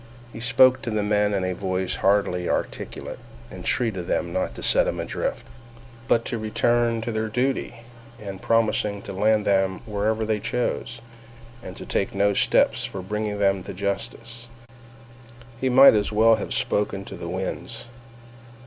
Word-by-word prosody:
He - - -8
spoke 130 +2 +4
to - - -4
the 110 -2 0
men 105 0 +2
in 100 -2 0
a 95 0 -1
voice 95 0 -2
hardly 95 -3 +1
articulate, - - -4 0.3
entreated 100 -8 -2
them 85 0 -1
not 95 - -2
to - - -8
set - - +3
him - - -2
adrift, - - -3 0.6
but 115 0 +2
to 120 - -2
return 115 +1 +1
to 115 - -3
their 110 0 -1
duty, 125 0 -2 0.4
and 100 -2 -8
promising 105 -3 +1
to - - -7
land 105 +2 +2
them 95 -1 +1
wherever 110 +1 -1
they 110 -1 0
chose, 115 +1 -2 0.6
and 95 -5 -9
to - - -8
take 100 - -1
no 100 +1 +3
steps - - +3
for 95 - -5
bringing 105 +1 -3
them 95 -1 +2
to 90 - -8
justice. 115 +4 -4 1.1
He 130 - 0
might 135 +2 +8
as 105 -1 +1
well 110 +2 +5
have 110 - -2
spoken 100 -1 -1
to - - -8
the 85 - -7
winds. 95 +5 -5
105 Hz, 160 wpm, -24 LUFS, 100-115 Hz, 1.1 s, might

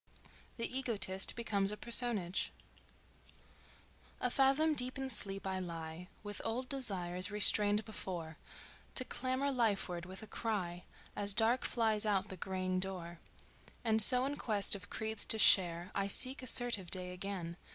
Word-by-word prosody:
The 230 - -2
Egotist 210 -7 0
Becomes 200 -4 -1
a 210 - -7
Personage 230 -7 +4 1.7
"A 250 - -1
fathom 275 +4 +2
deep 255 -1 +1
in 265 -1 -5
sleep 195 -3 -2
I 190 -1 -3
lie 165 -1 -8 0.2
With 205 -1 -7
old 240 +3 -4
desires, 185 -10 -1
restrained 210 0 +3
before, 170 -7 -6 0.6
To 255 - +2
clamor 260 +3 -3
lifeward 200 -8 -2
with 190 +3 -10
a - - -7
cry, 185 -6 -4 0.3
As 200 -1 -1
dark 235 +3 +2
flies 220 -2 +1
out 200 -1 -1
the 190 - -7
greying 185 0 -3
door; 175 -3 -6 0.6
And 220 -1 +2
so 250 +4 +6
in 285 +1 -4
quest 210 -4 +2
of 200 0 -3
creeds 220 0 0
to 220 - +1
share 175 -4 +3
I 195 0 -2
seek 255 +7 +3
assertive 245 -7 +3
day 180 0 -1
again... 180 -3 -6
205 Hz, 145 wpm, -33 LUFS, 185-240 Hz, 1.7 s, so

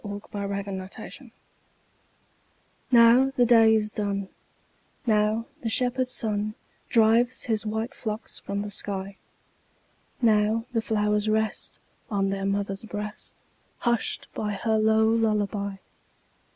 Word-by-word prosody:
Louisa 205 0 -7
May 200 -1 -2
Alcott 200 0 -4 0.3
Lullaby 260 +3 -9 1.6
NOW 240 +2 +7
the 245 - +4
day 225 -2 +6
is 215 -1 0
done, 200 -2 -2 0.8
Now 215 0 +2 0.2
the 230 - -2
shepherd 250 +2 +1
sun 215 -3 -2 0.3
Drives 230 +2 +3
his 220 -2 -1
white 220 +4 -2
flocks 220 -3 -5
from 200 +1 -3
the 210 - -6
sky; 195 -1 -4 1.0
Now 220 -1 +3
the 225 - +1
flowers 210 -1 +1
rest 220 0 -1 0.3
On 195 -2 0
their 195 0 -2
mother's 195 0 -1
breast, 210 -1 -7 0.4
Hushed 235 -2 -1
by 210 -1 -2
her 220 +2 0
low 220 0 +4
lullaby. 210 -3 0
215 Hz, 120 wpm, -26 LUFS, 205-225 Hz, 1.6 s, NOW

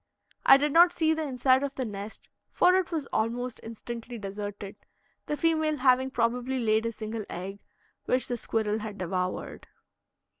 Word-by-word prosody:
I 270 - +10
did 290 +1 0
not 345 +1 +7
see 320 -2 +2
the 320 - -2
inside 260 0 +3
of 280 -1 -3
the 260 - -2
nest, 205 0 -7 0.2
for 360 - +4
it 370 -2 +1
was 315 -4 -2
almost 240 +2 -1
instantly 235 +1 -7
deserted, 205 0 -6 0.5
the 295 - -2
female 315 -2 +1
having 260 0 +3
probably 245 +1 0
laid 220 -1 +2
a - - -2
single 220 0 -5
egg, 195 +3 -6 0.5
which 255 0 +1
the 245 - -2
squirrel 220 -2 -1
had 210 -1 -6
devoured. 185 0 -3
240 Hz, 160 wpm, -28 LUFS, 215-275 Hz, 0.5 s, I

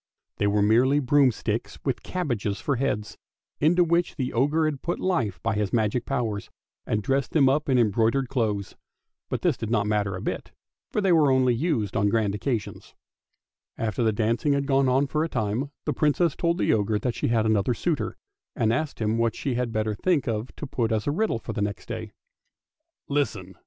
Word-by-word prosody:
They 100 - +1
were 100 0 +2
merely 125 +7 +4
broomsticks 135 -3 +1
with - - -1
cabbages 120 - -2
for 140 -3 -1
heads, 115 -5 -2 0.4
into 175 +4 +4
which 170 +1 +1
the 130 -3 -3
ogre 145 +6 +2
had 150 -3 -2
put 175 - -2
hie 175 - +1
by - - +1
his 105 -1 -1
magic 115 +1 0
powers 115 -7 -2 0.4
and 105 -1 0
dressed 135 +4 0
them 145 -4 +5
up 145 +2 +1
in 130 - +4
embroidered 115 +4 +2
clothes. 110 -7 -2 0.5
But - - -3
this - - +2
did 110 - -4
not 110 -3 +1
matter 105 -2 0
a 90 - -6
bit, - - -4 0.4
for 210 - -1
they 195 -2 +2
were 155 -4 +5
only 130 -1 +3
used 120 - -1
on 100 - +2
grand 105 -2 +1
occasions. 110 0 -4 0.8
After 110 +1 -2
the 110 -2 +3
dancing 115 +7 +1
had 140 0 0
gone 135 -1 +3
on 135 +3 +3
for 150 +2 -1
a 165 - -2
time, 110 +5 -1 0.2
the - - 0
Princess 155 +1 +2
told 170 0 0
the - - +2
ogre 105 0 +1
that 120 +3 -1
she - - -2
had 115 -2 +2
another 110 +2 +2
suitor, 160 +4 -2 0.4
and 115 -1 +2
asked 150 +4 -2
him 110 +1 0
what 115 -2 +1
she 135 - -2
had 120 -1 -1
better 110 -1 -1
think 155 - 0
of 115 +1 -2
to - - -6
put 120 -4 -1
as 110 -1 0
a 145 - +1
riddle 215 - 0
the 115 -1 -5
next 100 0 -3
day. - - -6 0.5
" 330 +1 -62
Listen! 105 -11 -2
120 Hz, 200 wpm, -25 LUFS, 110-145 Hz, 0.8 s, them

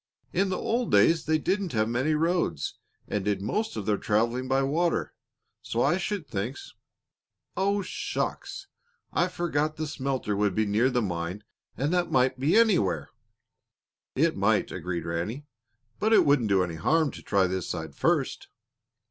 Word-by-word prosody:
"In 190 +2 +2
the 185 - -1
old 235 +1 -1
days 165 -1 +4
they 155 0 +2
didn't 190 +2 -1
have 110 -1 +2
many 130 +7 +1
roads 160 - 0 0.3
and 105 - -2
did 100 -1 0
most 215 - -2
of 105 - -4
their 105 -1 +1
traveling 115 +4 0
by 135 +1 +2
water, 165 +5 0 0.5
so 115 - -1
I 175 - +3
should 190 -2 -3
think 115 +4 -3 1.0
Oh, 200 +1 +1
shucks! 405 - -4 0.5
I 175 - +2
forgot 155 -4 -1
the 155 - -3
smelter 135 -7 -2
would 100 -2 +1
be 110 - +2
near 110 +5 +2
the 125 -2 0
mine 90 +1 -3 0.3
and 145 +6 0
that 175 -1 +1
might 130 0 +2
be 150 +10 +3
anywhere." 200 - +2 1.0
"It - - +2
might," - - +1
agreed 85 0 -4
Ranny; 90 - -3 0.5
"but 220 +1 +2
it - - +6
won't 140 -5 +3
do 95 -2 +3
any 85 -2 -4
harm 155 - +2
to - - -10
try 100 -2 +2
this 95 -1 -2
side 80 -3 -4
first." - - 0
130 Hz, 165 wpm, -27 LUFS, 105-170 Hz, 1.0 s, it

